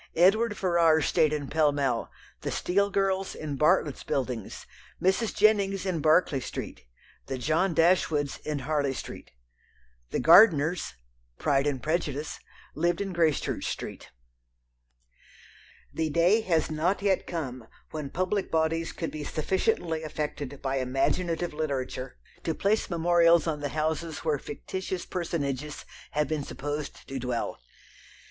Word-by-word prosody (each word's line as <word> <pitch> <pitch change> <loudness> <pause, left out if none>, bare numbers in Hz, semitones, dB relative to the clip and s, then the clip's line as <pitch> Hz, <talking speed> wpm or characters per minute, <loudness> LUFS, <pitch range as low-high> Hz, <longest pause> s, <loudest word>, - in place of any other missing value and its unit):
Edward 205 +5 +4
Ferrars 165 -5 +3
stayed 155 - +3
in 145 -2 -2
Pall 155 0 +3
Mall, 135 -5 -1 0.3
the - - -3
Steele 200 +3 +1
girls 195 -1 0
in 150 -2 -4
Bartlett's 150 -1 +2
Buildings, 125 -5 -3 0.3
Mrs. 190 +4 +1
Jennings 200 -2 +2
in 180 -4 -1
Berkeley 155 -2 +3
Street, 120 - -7 0.4
the 135 - -3
John 160 +7 +1
Dashwoods 160 -4 +2
in 150 -1 -3
Harley 145 -3 0
Street. - - -8 0.8
The - - -1
Gardiners 160 - +5 0.4
(Pride 140 -1 +2
and 135 -4 -2
Prejudice) 155 -2 -2 0.3
lived 170 +2 0
in 195 -2 -3
Gracechurch 165 -3 +1
Street. - - -5 1.8
The 160 -1 -1
day 175 +8 +4
has 160 -2 +2
not 175 +6 0
yet 195 -2 +1
come 130 -8 -5 0.2
when 150 -3 -5
public 185 +5 -1
bodies 165 +1 0
could 165 - -4
be 155 -1 -5
sufficiently 165 +1 0
affected 150 -3 -5
by 135 0 0
imaginative 165 +7 0
literature 135 -4 -3 0.3
to 160 - -1
place 210 +2 +1
memorials 170 -1 +4
on 155 -3 -1
the 145 0 -3
houses 155 +2 -2
where 150 -3 +1
fictitious 185 +5 -5
personages 150 -5 -3 0.3
have 150 -1 +1
been 155 -1 -2
supposed 145 +2 -5
to 135 -1 -4
dwell. 125 -1 -3
155 Hz, 130 wpm, -28 LUFS, 145-175 Hz, 1.8 s, Gardiners